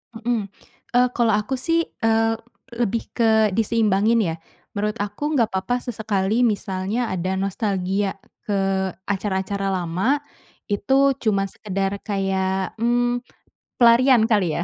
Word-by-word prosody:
Mmm, 225 Hz, -2 st, -1 dB, 0.5 s
eee, 250 Hz, 0 st, +5 dB
kalau 230 Hz, -3 st, +2 dB
aku, 210 Hz, +6 st, -1 dB
sih, 330 Hz, +4 st, +1 dB, 0.2 s
eee, 225 Hz, 0 st, +3 dB, 0.4 s
lebih 230 Hz, 0 st, 0 dB
ke 220 Hz, -3 st, +3 dB
diseimbangin 225 Hz, 0 st, +2 dB
ya. 165 Hz, -2 st, -1 dB, 0.4 s
Menurut 210 Hz, +2 st, -1 dB
aku 250 Hz, +10 st, -3 dB
nggak 230 Hz, -4 st, +3 dB
papa 245 Hz, +6 st, -1 dB
sesekali 215 Hz, 0 st, 0 dB
misalnya 205 Hz, +3 st, -2 dB
ada 185 Hz, +1 st, -1 dB
nostalgia 195 Hz, 0 st, -1 dB, 0.3 s
ke 195 Hz, -2 st, 0 dB, 0.2 s
acara-acara 195 Hz, 0 st, -1 dB
lama, 185 Hz, -, 0 dB, 0.5 s
itu 270 Hz, +6 st, +3 dB
cuma 200 Hz, -3 st, +2 dB
sekedar 195 Hz, 0 st, -3 dB
kayak, 190 Hz, -2 st, -1 dB
mmm, 245 Hz, +1 st, +1 dB, 0.6 s
pelarian 240 Hz, 0 st, +6 dB
kali 200 Hz, -8 st, +1 dB
ya. 170 Hz, -, -1 dB
210 Hz, 120 wpm, -22 LUFS, 195-235 Hz, 0.6 s, pelarian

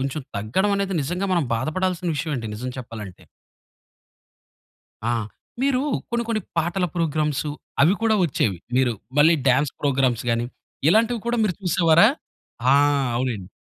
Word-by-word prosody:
కొంచుం 135 Hz, +2 st, -3 dB
తగ్గడవనేది 195 Hz, -, 0 dB
నిజంగా 180 Hz, +7 st, -2 dB
మనం 170 Hz, -5 st, +2 dB
బాధపడాల్సిన 180 Hz, +7 st, -1 dB
విషయవే 150 Hz, +1 st, -2 dB
అండి 110 Hz, -2 st, -5 dB
నిజం 125 Hz, +4 st, -5 dB
చెప్పాలంటే. 110 Hz, -6 st, -8 dB, 1.8 s
ఆ! 120 Hz, -, +1 dB, 0.5 s
మీరూ 270 Hz, -1 st, +2 dB, 0.3 s
కొన్ని 235 Hz, 0 st, 0 dB
కొన్ని 220 Hz, -2 st, 0 dB, 0.2 s
పాటల 175 Hz, +3 st, 0 dB
ప్రోగ్రామ్సు, 155 Hz, -3 st, 0 dB, 0.3 s
అవి 170 Hz, +6 st, +5 dB
కూడా 225 Hz, -1 st, +3 dB
ఒచ్చేవి. 110 Hz, -, 0 dB, 0.2 s
మీరు 130 Hz, -2 st, +3 dB, 0.3 s
మళ్ళీ 160 Hz, +3 st, +6 dB
డాన్స్ 135 Hz, +3 st, +2 dB
ప్రోగ్రామ్స్ 130 Hz, -4 st, +1 dB
గానీ, 115 Hz, +1 st, 0 dB, 0.4 s
ఇలాంటివి 225 Hz, +4 st, +3 dB
కూడా 240 Hz, -, +1 dB
మీరు 185 Hz, -5 st, 0 dB
చూసేవారా? 170 Hz, +1 st, +5 dB, 0.6 s
ఆ! -, -, +6 dB, 0.4 s
అవునండి. 115 Hz, -7 st, -2 dB
155 Hz, 130 wpm, -23 LUFS, 125-190 Hz, 1.8 s, మళ్ళీ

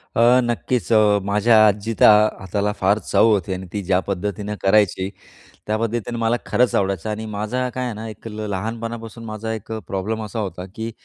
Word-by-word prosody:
अ, 120 Hz, +2 st, +5 dB
नक्कीच 120 Hz, 0 st, -1 dB
अ, 105 Hz, -2 st, +5 dB
माझ्या 105 Hz, +3 st, +3 dB
आजीचा 105 Hz, +2 st, +3 dB, 0.3 s
हाताला 100 Hz, +2 st, -1 dB
फार 100 Hz, +3 st, +3 dB
चव -, -, +5 dB
होती 100 Hz, -4 st, +1 dB
आणि 95 Hz, 0 st, -6 dB
ती 105 Hz, -, -2 dB
ज्या 90 Hz, 0 st, +2 dB
पद्धतीनं 100 Hz, +2 st, -3 dB
करायची 95 Hz, -1 st, +2 dB, 0.6 s
त्या 110 Hz, +1 st, 0 dB
पद्धतीने 115 Hz, +1 st, -2 dB
मला 115 Hz, +1 st, +1 dB
खरंच 125 Hz, 0 st, +2 dB
आवडायचं 100 Hz, +1 st, 0 dB
आणि 110 Hz, +1 st, -4 dB
माझा 110 Hz, +5 st, -2 dB
काय 130 Hz, 0 st, -2 dB
आहे 120 Hz, -, -3 dB
ना 110 Hz, +1 st, -7 dB
एक 110 Hz, +1 st, -9 dB
ल 105 Hz, 0 st, -5 dB
लहानपणापासून 115 Hz, +3 st, -5 dB
माझा 110 Hz, +1 st, -5 dB
एक 110 Hz, 0 st, -6 dB
अ, 110 Hz, -, -2 dB
प्रॉब्लेम 105 Hz, +4 st, -3 dB
असा 110 Hz, +2 st, -6 dB
होता, 95 Hz, -3 st, -5 dB
की 115 Hz, +1 st, -4 dB
110 Hz, 185 wpm, -21 LUFS, 100-115 Hz, 0.6 s, अ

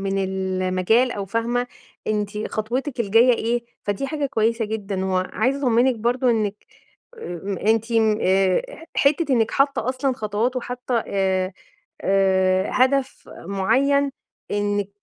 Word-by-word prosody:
من 195 Hz, 0 st, -1 dB
المجال، 190 Hz, +4 st, +1 dB
أو 200 Hz, -1 st, -4 dB
فاهمة 235 Hz, +4 st, -1 dB, 0.4 s
أنتِ 210 Hz, 0 st, -2 dB
خطوِتِك 245 Hz, +5 st, -3 dB
الجاية 230 Hz, +4 st, +5 dB
إيه؟ 235 Hz, +1 st, -1 dB, 0.2 s
فدي 205 Hz, +7 st, -2 dB
حاجة 295 Hz, -1 st, -2 dB
كويسة 230 Hz, -3 st, 0 dB
جدًا. 205 Hz, -3 st, -3 dB
وعايزة 190 Hz, +8 st, 0 dB
أطمّنِك 250 Hz, -1 st, +3 dB
برضه 240 Hz, +3 st, 0 dB
آآ 245 Hz, -, +6 dB
إنِّك 210 Hz, -2 st, -1 dB, 0.5 s
أ 195 Hz, -, -4 dB
أنتِ 225 Hz, +1 st, -1 dB
ن 220 Hz, -2 st, +3 dB
آآ 190 Hz, -, +3 dB
ح 415 Hz, -10 st, -11 dB, 0.2 s
حتّة 290 Hz, -1 st, +1 dB
إنِّك 225 Hz, -2 st, +2 dB
حاطّة 275 Hz, -2 st, +1 dB
أصلًا 260 Hz, +1 st, 0 dB
خطوات، 220 Hz, +2 st, -1 dB
وحاطّة 245 Hz, -1 st, -2 dB
آآ 190 Hz, -1 st, 0 dB, 0.5 s
آآ 190 Hz, -1 st, +2 dB
هدف 260 Hz, +1 st, +1 dB, 0.2 s
معيّن 275 Hz, +9 st, +2 dB, 0.4 s
إنِّك 205 Hz, -1 st, -1 dB
220 Hz, 130 wpm, -22 LUFS, 195-255 Hz, 0.5 s, آآ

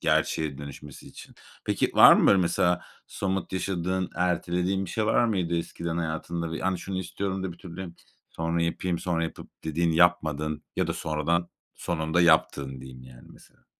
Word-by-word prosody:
gerçeğe 75 Hz, -4 st, +1 dB
dönüşmesi 70 Hz, +1 st, -10 dB
için. -, -, -13 dB, 0.3 s
Peki -, -, +1 dB
var -, -, +10 dB
mı -, -, +3 dB
böyle 100 Hz, -, +6 dB
mesela 90 Hz, 0 st, +2 dB, 0.2 s
somut 95 Hz, -1 st, -3 dB
yaşadığın, 95 Hz, 0 st, -1 dB
ertelediğin 90 Hz, +2 st, 0 dB
bir 85 Hz, -, -7 dB
şey 110 Hz, -1 st, -1 dB
var 120 Hz, -, +3 dB
mıydı 90 Hz, -6 st, 0 dB
eskiden 85 Hz, 0 st, -4 dB
hayatında? 80 Hz, 0 st, -3 dB
Yani 95 Hz, 0 st, -1 dB
şunu 95 Hz, 0 st, -4 dB
istiyorum 95 Hz, +1 st, -3 dB
da 90 Hz, -, -3 dB
bir 85 Hz, -, -17 dB
türlü 90 Hz, -1 st, -8 dB, 0.4 s
sonra 85 Hz, +1 st, -1 dB
yapayım, 85 Hz, +1 st, -1 dB
sonra 85 Hz, -2 st, -1 dB
yapıp 80 Hz, -, -8 dB
dediğin, 80 Hz, +1 st, +1 dB
yapmadın 80 Hz, -3 st, +2 dB
ya -, -, +1 dB
da -, -, -1 dB
sonradan, 80 Hz, +3 st, -1 dB, 0.3 s
sonunda 80 Hz, 0 st, -1 dB
yaptığın 70 Hz, -5 st, +3 dB
diyeyim 65 Hz, -1 st, -11 dB
yani 65 Hz, -1 st, -15 dB
mesela. -, -, -21 dB
85 Hz, 160 wpm, -27 LUFS, 80-90 Hz, 0.4 s, var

